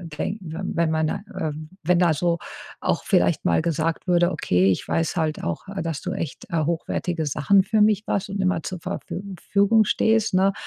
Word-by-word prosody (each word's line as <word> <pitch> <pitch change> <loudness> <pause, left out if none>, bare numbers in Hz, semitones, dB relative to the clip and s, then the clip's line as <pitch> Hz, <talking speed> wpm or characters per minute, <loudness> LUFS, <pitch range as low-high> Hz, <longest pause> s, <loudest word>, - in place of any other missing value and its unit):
weng 195 +7 -3
w 160 -3 -7
wenn 170 -3 0
man 160 0 +1
da, - - -1 0.2
äh 160 -4 -1 0.3
wenn 175 +2 +3
da 170 -3 +4
so 170 +2 +1 0.4
auch - - -1
vielleicht - - +2
mal 85 - +2
gesagt 165 +1 -1
würde: 175 -1 +3
„Okay, 90 +2 +2
ich 90 - -2
weiß 165 +2 0
halt 155 -2 -1
auch, 85 - -4
äh, 195 0 -4
dass 160 -4 -3
du - - -3
echt, 155 - -5
äh, 165 -2 0
hochwertige 165 +1 -2
Sachen 150 +7 +3
für 215 +2 +1
mich 210 0 +3
machst 200 +1 -1
und 195 +1 -4
immer 185 -4 +1
zur 180 +4 -5
Verfü 180 - -5 0.3
Fügung 200 +3 +5
stehst, 220 0 +2
ne? 190 +1 +3
170 Hz, 200 wpm, -23 LUFS, 160-195 Hz, 0.4 s, Fügung